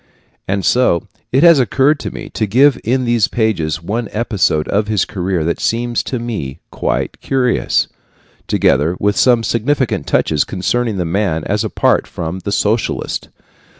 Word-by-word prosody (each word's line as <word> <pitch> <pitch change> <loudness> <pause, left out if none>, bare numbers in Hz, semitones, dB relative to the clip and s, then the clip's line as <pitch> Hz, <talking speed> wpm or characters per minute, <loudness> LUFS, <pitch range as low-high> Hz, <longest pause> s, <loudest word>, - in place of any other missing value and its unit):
And 100 0 -1
so 120 -9 +2 0.2
it 135 +4 +3
has 170 -4 +7
occurred 135 +4 +2
to - - -4
me - - -8
to 110 - -1
give 135 +6 +4
in 125 +3 0
these 120 -3 +2
pages 85 -9 -1
one 110 +6 -3
episode 105 -9 0
of 105 +1 +1
his 105 -4 +1
career 90 -3 -2
that 85 +1 -1
seems 120 +1 0
to 130 - -3
me 110 - -4
quite - - -2
curious, 130 -2 +1 0.6
together 75 +6 +2
with 105 0 +1
some 120 -3 +3
significant 115 - 0
touches 75 -2 +2
concerning 110 +3 -1
the 90 - -1
man 85 -2 -1
as - - -1
apart - - +1
from 85 +2 -5
the 100 - -5
socialist. 110 +3 -1
110 Hz, 155 wpm, -16 LUFS, 90-120 Hz, 0.6 s, has